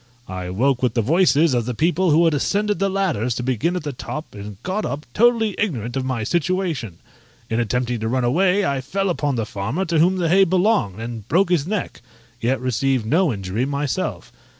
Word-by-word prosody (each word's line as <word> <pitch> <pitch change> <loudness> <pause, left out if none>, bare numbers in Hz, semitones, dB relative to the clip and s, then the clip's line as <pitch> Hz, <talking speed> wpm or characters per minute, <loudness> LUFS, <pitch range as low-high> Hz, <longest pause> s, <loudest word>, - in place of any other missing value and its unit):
I 90 -1 -5
woke 125 +7 +1
with 125 -3 0
the 115 - +2
voices 160 - +3
of 120 -2 0
the 125 - -2
people 175 +6 +2
who 160 +3 +4
had 165 - +3
ascended 205 +8 0
the 195 0 +1
ladders 170 - 0
to 125 - -3
begin 130 - 0
at 180 - -3
the 145 -2 -4
top, 140 +5 -7
and 100 -1 -8
got 195 +4 -2
up, 145 +2 -4
totally 225 - +3
ignorant 125 - -2
of 135 - -1
my 130 -4 -2
situation: 165 - -1 0.5
in 115 - +1
attempting 120 +1 -1
to 110 - -2
run 130 +2 0
away 185 +10 +2
I 140 -1 -1
fell 195 +7 -1
upon 145 -5 -1
the 115 -2 -1
farmer 115 - -3
to 165 -2 +1
whom 180 +4 +3
the 175 -2 0
hay 190 +4 +5
belonged, 185 - +1
and 115 -2 -6
broke 180 +5 +2
his 165 -4 +2
neck, 205 -1 -3 0.4
yet 130 +3 +1
received 130 0 0
no 160 +6 +2
injury 100 +2 -3
myself. 140 0 -3
140 Hz, 205 wpm, -21 LUFS, 120-180 Hz, 0.5 s, hay